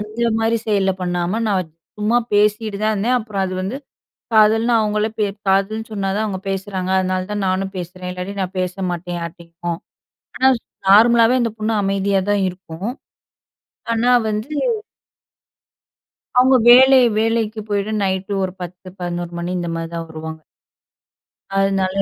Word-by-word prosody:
அந்த 215 Hz, +3 st, -1 dB
மாரி 225 Hz, +1 st, +2 dB
செயல்ல 200 Hz, -3 st, +2 dB
பண்ணாம, 175 Hz, +4 st, -1 dB
நான் 185 Hz, -5 st, -1 dB, 0.3 s
சும்மா 220 Hz, +3 st, +2 dB, 0.2 s
பேசிட்டு 210 Hz, 0 st, +2 dB
தான் 215 Hz, -, +2 dB
இருந்தேன். 235 Hz, +5 st, +1 dB
அப்புறம் 210 Hz, -3 st, -3 dB
அது 185 Hz, 0 st, -3 dB
வந்து 200 Hz, +8 st, -3 dB, 0.6 s
காதல்னு 225 Hz, +2 st, +4 dB
அவங்களே 210 Hz, 0 st, 0 dB, 0.4 s
"காதல்ன்னு" 205 Hz, +3 st, +1 dB
சொன்னா 195 Hz, -2 st, -2 dB
தான் 220 Hz, -, 0 dB
அவங்க 190 Hz, -3 st, -4 dB
பேசுறாங்க. 195 Hz, -1 st, -3 dB
அதனால 185 Hz, 0 st, -1 dB
தான் 205 Hz, -1 st, -2 dB
நானும் 190 Hz, +1 st, -1 dB
பேசுறேன். 180 Hz, +1 st, -6 dB
இல்லாட்டி 180 Hz, +2 st, -5 dB
நான் 185 Hz, +1 st, -5 dB
பேச 180 Hz, 0 st, -2 dB, 0.2 s
மாட்டேன் 175 Hz, 0 st, -4 dB
யார்ட்டயும். 170 Hz, 0 st, -6 dB, 0.6 s
ஆனா 265 Hz, +1 st, +5 dB, 0.4 s
நார்மலாவே 230 Hz, +4 st, +6 dB
அந்த 230 Hz, -, 0 dB
பொண்ணு 220 Hz, +1 st, -1 dB
அமைதியா 195 Hz, 0 st, +1 dB
தான் 205 Hz, -1 st, +2 dB
இருக்கும். 185 Hz, +4 st, -6 dB, 1.0 s
ஆனா 235 Hz, +2 st, +2 dB, 0.2 s
வந்து 215 Hz, +7 st, -3 dB, 1.9 s
அவங்க 260 Hz, +1 st, +6 dB
வேலை 260 Hz, +2 st, +8 dB, 0.2 s
வேலைக்கு 225 Hz, -1 st, 0 dB
போயிட்டு 205 Hz, +1 st, -1 dB
நைட்‌டு 190 Hz, +1 st, -1 dB
ஒரு 185 Hz, -, -3 dB
10:00 180 Hz, +1 st, -8 dB
11:00 175 Hz, -1 st, -4 dB
மணி 175 Hz, +1 st, -3 dB
இந்த 170 Hz, -1 st, -3 dB
மாதிரி 165 Hz, 0 st, -5 dB
தான் 165 Hz, 0 st, -5 dB
வருவாங்க. 160 Hz, 0 st, -7 dB, 1.2 s
அதுனால, 195 Hz, 0 st, +1 dB
195 Hz, 140 wpm, -20 LUFS, 180-220 Hz, 1.9 s, வேலை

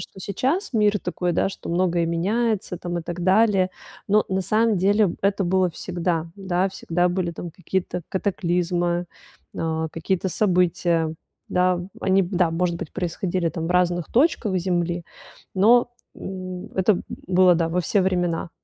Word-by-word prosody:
что -, -, -10 dB
сейчас 265 Hz, -, -1 dB
мир 210 Hz, -2 st, +3 dB
такой, 180 Hz, 0 st, -2 dB
да, 170 Hz, -, +1 dB
что 195 Hz, -, -9 dB
многое 175 Hz, -1 st, +1 dB
меняется 195 Hz, +4 st, 0 dB
там 175 Hz, -1 st, -3 dB
и -, -, -5 dB
так 175 Hz, +1 st, -5 dB
далее, 190 Hz, -1 st, +3 dB, 0.4 s
но 210 Hz, +1 st, +4 dB
на 190 Hz, 0 st, 0 dB
самом 215 Hz, +3 st, +2 dB
деле 200 Hz, +1 st, +3 dB
это 200 Hz, 0 st, +1 dB
было 185 Hz, 0 st, +2 dB
всегда. 170 Hz, -1 st, -2 dB
Да, 190 Hz, -1 st, 0 dB
всегда 175 Hz, -1 st, 0 dB
были 175 Hz, -1 st, -1 dB
там 170 Hz, +1 st, -7 dB
какие-то 180 Hz, -1 st, -3 dB
катаклизмы, 175 Hz, -2 st, 0 dB, 0.5 s
а, 160 Hz, 0 st, -1 dB
какие-то 185 Hz, +3 st, -1 dB
события, 175 Hz, -4 st, +1 dB, 0.3 s
да? 180 Hz, -1 st, +2 dB, 0.2 s
Они, 195 Hz, 0 st, +3 dB
да, 180 Hz, -2 st, +1 dB
может 170 Hz, +1 st, 0 dB
быть, 165 Hz, -, -7 dB
происходили 175 Hz, -1 st, -2 dB
там 165 Hz, 0 st, -4 dB
в -, -, -3 dB
разных 175 Hz, -1 st, +2 dB
точках 240 Hz, -, +2 dB
Земли, 175 Hz, -1 st, -1 dB, 0.5 s
но, 240 Hz, +5 st, +5 dB, 0.3 s
м, 185 Hz, -1 st, -7 dB
это 190 Hz, 0 st, +3 dB, 0.3 s
было, 180 Hz, -1 st, +5 dB
да, 165 Hz, -1 st, +1 dB
во 180 Hz, +2 st, 0 dB
все 190 Hz, +4 st, +1 dB
времена. 175 Hz, -3 st, 0 dB
180 Hz, 150 wpm, -23 LUFS, 175-195 Hz, 0.5 s, но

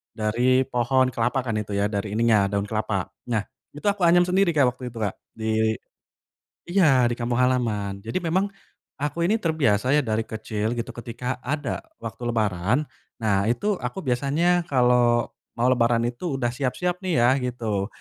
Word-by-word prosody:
dari 120 Hz, +4 st, +2 dB
pohon 130 Hz, +1 st, +1 dB
kelapa 120 Hz, +3 st, 0 dB
kan 115 Hz, -3 st, -1 dB
itu 105 Hz, -1 st, -4 dB
ya 100 Hz, +1 st, 0 dB
dari 100 Hz, 0 st, -3 dB
ininya 110 Hz, -3 st, +3 dB
daun 100 Hz, 0 st, -1 dB
kelapa 105 Hz, -3 st, -2 dB, 0.2 s
nah 110 Hz, -4 st, 0 dB, 0.3 s
itu 150 Hz, -, -10 dB
aku 200 Hz, -4 st, +2 dB
anyam 175 Hz, +1 st, +6 dB
sendiri 180 Hz, -1 st, +2 dB
Kak 130 Hz, -4 st, +4 dB
waktu 125 Hz, +1 st, -8 dB
itu 120 Hz, -, -9 dB
Kak 105 Hz, -4 st, -2 dB, 0.2 s
di 110 Hz, 0 st, +1 dB, 1.0 s
iya 155 Hz, -10 st, +5 dB
di 120 Hz, -, +2 dB
kampung 120 Hz, 0 st, -2 dB
halaman 115 Hz, -6 st, 0 dB
jadi 115 Hz, +3 st, -6 dB
memang, 185 Hz, +3 st, +1 dB, 0.5 s
aku 150 Hz, +4 st, -2 dB
ini 210 Hz, +7 st, +2 dB
terbiasa 140 Hz, -, +1 dB
ya 150 Hz, -, +4 dB
dari 110 Hz, -1 st, -1 dB
kecil 110 Hz, +1 st, -3 dB
gitu 120 Hz, 0 st, -4 dB
ketika 120 Hz, +2 st, -5 dB
ada 140 Hz, 0 st, -3 dB, 0.2 s
waktu 115 Hz, -3 st, -6 dB
lebaran, 110 Hz, +1 st, +1 dB, 0.4 s
nah 100 Hz, -2 st, +2 dB
itu 180 Hz, -, 0 dB
aku 125 Hz, +10 st, -5 dB
biasanya 155 Hz, +7 st, +1 dB
kalo 125 Hz, -4 st, +3 dB, 0.2 s
mau 120 Hz, +2 st, +2 dB
lebaran 115 Hz, -2 st, +3 dB
itu 125 Hz, +6 st, -3 dB
udah 120 Hz, -3 st, 0 dB
siap-siap 145 Hz, +8 st, -2 dB
nih 185 Hz, -2 st, -2 dB
ya 120 Hz, -, +5 dB
gitu 115 Hz, -6 st, -2 dB
120 Hz, 165 wpm, -24 LUFS, 110-140 Hz, 1.0 s, anyam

